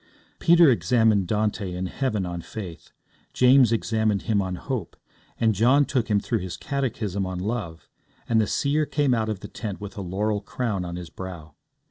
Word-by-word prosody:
Peter 170 0 +6
examined 110 -5 +3
Dante 105 -2 -1
in 90 +1 -3
heaven 105 -2 -1
on 85 -1 -4
faith, 95 -4 -8 0.4
James 125 -2 +5
examined 110 -2 0
him 105 -3 +1
on 95 -1 -3
hope, 120 -2 -5 0.4
and 115 -1 +3
John 125 +8 +4
took 130 -5 0
him 105 -3 +2
through 115 +2 -1
his 90 -2 -6
catechism 110 -8 -2
on 95 -1 -4
love, 90 -5 -4 0.4
and 115 -1 +3
the 105 - 0
seer 150 +5 +1
came 145 -4 +1
out 110 -2 0
of 105 -4 -3
the - - -7
tent 105 -5 -6
with 105 -1 -8
a 100 - -5
laurel 100 +3 -1
crown 105 -6 -3
on 85 0 -5
his 85 -2 -8
brow. 85 -5 -8
105 Hz, 180 wpm, -25 LUFS, 95-120 Hz, 0.4 s, Peter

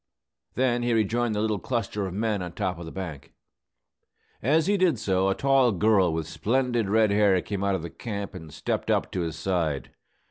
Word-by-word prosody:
Then 120 -1 +1
he 120 0 +1
rejoined 115 +1 +1
the 105 - 0
little 110 -2 0
cluster 105 -4 -2
of 90 - -6
men 105 -1 0
on 90 -1 -5
top 90 -2 -2
of 85 - -7
the - - -7
bank. 80 -7 -7 1.1
As 155 +6 +3
he 205 - +2
did 185 -8 +3
so, 95 -3 +1
a 95 - +1
tall 135 -3 +3
girl 100 -2 +3
with 80 -1 -3
splendid 120 +5 0
red 110 0 +3
hair 100 -2 +4
came 100 -2 -3
out 100 -1 +2
of 90 - -4
the 85 - -6
camp 100 -3 -5
and 80 -4 -9
stepped 75 - -3
up - - +1
to 90 - -2
his 80 -2 -3
side. 80 -5 -1
100 Hz, 205 wpm, -26 LUFS, 90-115 Hz, 1.1 s, hair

